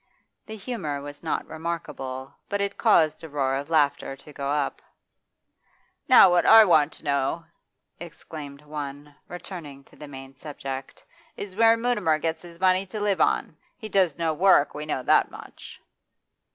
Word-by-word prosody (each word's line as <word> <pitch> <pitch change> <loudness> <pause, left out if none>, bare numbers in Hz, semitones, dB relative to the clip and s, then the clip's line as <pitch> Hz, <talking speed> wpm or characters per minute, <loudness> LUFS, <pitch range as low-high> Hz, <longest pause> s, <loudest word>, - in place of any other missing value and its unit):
The 220 - -7
humour 195 - -4
was 145 +1 -10
not 160 - -2
remarkable, 135 -5 -6 0.2
but 200 - -1
it 200 0 -2
caused 165 -9 +3
a 160 - -8
roar 135 -2 -1
of 140 +3 -3
laughter 145 -3 +1
to 145 +2 -16
go 140 -1 -4
up. 145 -1 -1 1.3
'Now 190 - +8
what 175 0 +3
I 225 -1 +8
want 160 -5 +4
to - - -12
know,' 140 +4 -1 0.5
exclaimed 145 -2 -10
one, 145 -1 -7
returning 165 -6 -9
to - - -21
the 150 - -11
main 135 -1 -11
subject, 135 -1 -8 0.3
'is 195 -2 -7
where 225 +1 +5
Mutimer 230 -10 +1
gets 160 +1 -3
his 170 -1 -13
money 185 +1 +2
to 215 +4 -6
live 205 -2 0
on. - - +1 0.2
He 220 -3 -8
does 185 -7 +2
no 165 -2 0
work, 175 -3 +4
we 150 +1 -6
know 130 -4 -2
that - - +3
much. - - -12
155 Hz, 165 wpm, -25 LUFS, 140-185 Hz, 1.3 s, Now